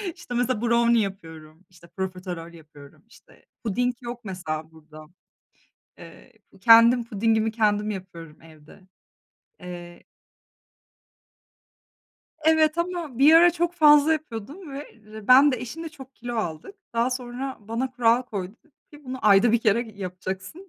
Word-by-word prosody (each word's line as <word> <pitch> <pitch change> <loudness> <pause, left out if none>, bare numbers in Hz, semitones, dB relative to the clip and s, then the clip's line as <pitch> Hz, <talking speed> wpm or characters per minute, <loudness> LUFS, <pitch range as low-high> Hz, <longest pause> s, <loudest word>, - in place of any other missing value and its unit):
İşte, 250 - -10
mesela, 245 -2 -1
brownie 235 -1 +3
yapıyorum, 165 -4 -8
işte, 170 -1 -19
profiterol 180 -2 -6
yapıyorum, 150 -2 -16
işte, 230 - -22 0.2
puding 245 +3 -1
yok 240 0 -7
mesela 160 -5 -6
burada. 155 -1 -15 0.9
Eee, - - -15 0.3
kendim 230 +3 +6
pudingimi 225 0 0
kendim 215 -1 0
yapıyorum 170 -6 -9
evde, 155 +1 -17 0.8
eee 175 -1 -10 2.4
Evet, 315 0 +3
ama 340 -7 -4
bir 300 +4 +7
ara 345 +1 +7
çok 345 0 -1
fazla 300 -2 +6
yapıyordum 290 - -6
ve, 280 +2 -8
eee, 215 -1 -14
ben 270 +3 +7
de, 255 - -1
eşim 270 +7 -7
de - - -5
çok 270 -4 -14
kilo 240 0 -7
aldık. 175 - -5 0.2
Daha 235 +2 +1
sonra 255 +1 -5
bana 230 +5 -4
kural 240 -1 +2
koydu 200 -6 -6
dedi 315 - -30 0.2
ki: 295 0 -15
"Bunu 260 0 -6
ayda 205 +3 +5
1 235 - +4
kere 220 +1 0
yapacaksın." 190 - -7
230 Hz, 135 wpm, -24 LUFS, 185-260 Hz, 2.4 s, bir